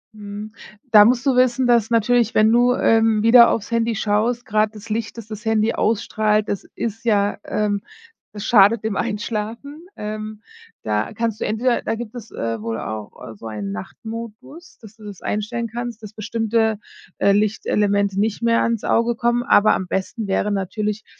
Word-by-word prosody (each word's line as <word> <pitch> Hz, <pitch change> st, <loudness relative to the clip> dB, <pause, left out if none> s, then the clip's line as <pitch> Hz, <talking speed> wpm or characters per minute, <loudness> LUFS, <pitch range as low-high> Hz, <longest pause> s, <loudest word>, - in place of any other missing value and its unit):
Mhm. 210 Hz, +1 st, -8 dB, 0.4 s
Da 210 Hz, -2 st, +9 dB
musst 245 Hz, +2 st, +2 dB
du 270 Hz, -2 st, +3 dB
wissen, 250 Hz, 0 st, +3 dB
dass 235 Hz, -3 st, +3 dB
natürlich, 230 Hz, 0 st, +2 dB
wenn 215 Hz, +1 st, +5 dB
du, 245 Hz, +1 st, +4 dB
ähm, 225 Hz, -2 st, +3 dB
wieder 235 Hz, +1 st, +8 dB
auf's 220 Hz, -, -2 dB
Handy 230 Hz, 0 st, 0 dB
schaust, 220 Hz, +3 st, 0 dB
grad 215 Hz, +1 st, +1 dB
das 210 Hz, +1 st, -11 dB
Licht, 225 Hz, +1 st, -3 dB
das 225 Hz, -, -8 dB
das 215 Hz, 0 st, -8 dB
Handy 220 Hz, 0 st, +1 dB
ausstrahlt, 215 Hz, -1 st, 0 dB
das 200 Hz, -, -3 dB
ist 225 Hz, 0 st, -4 dB
ja, 205 Hz, -2 st, +2 dB
ähm 205 Hz, -1 st, -1 dB, 0.5 s
das 205 Hz, -1 st, -7 dB
schadet 215 Hz, 0 st, +5 dB
dem 220 Hz, -2 st, -2 dB
Einschlafen. 230 Hz, -, -4 dB
Ähm, 215 Hz, 0 st, -6 dB, 0.4 s
da 105 Hz, 0 st, -1 dB
kannst 225 Hz, -1 st, -2 dB
du -, -, -2 dB
entweder 235 Hz, +3 st, 0 dB
da 225 Hz, -, -1 dB
gibt 230 Hz, 0 st, -8 dB
es, 225 Hz, -3 st, -9 dB
äh, 115 Hz, -1 st, -4 dB
wohl 115 Hz, 0 st, -3 dB
auch 105 Hz, 0 st, -6 dB, 0.2 s
so 115 Hz, -, -10 dB
einen 105 Hz, -2 st, -5 dB
Nachtmodus, 230 Hz, -, -9 dB
dass 220 Hz, 0 st, -14 dB
du 215 Hz, -, -14 dB
das 200 Hz, -3 st, -9 dB
einstellen 230 Hz, +3 st, -3 dB
kannst, 235 Hz, 0 st, -6 dB
dass 210 Hz, -, -8 dB
bestimmte, 220 Hz, 0 st, 0 dB, 0.4 s
äh, 200 Hz, -, +3 dB
Lichtelemente 205 Hz, -1 st, +1 dB
nicht 215 Hz, +2 st, -1 dB
mehr 230 Hz, 0 st, +3 dB
ans 230 Hz, -2 st, -1 dB
Auge 235 Hz, +1 st, +1 dB
kommen. 240 Hz, +1 st, 0 dB
Aber 215 Hz, -2 st, +4 dB
am 185 Hz, -, -2 dB
besten 195 Hz, +4 st, -3 dB
wäre 200 Hz, +2 st, 0 dB
natürlich, 210 Hz, +2 st, -3 dB
215 Hz, 175 wpm, -21 LUFS, 205-230 Hz, 0.5 s, Da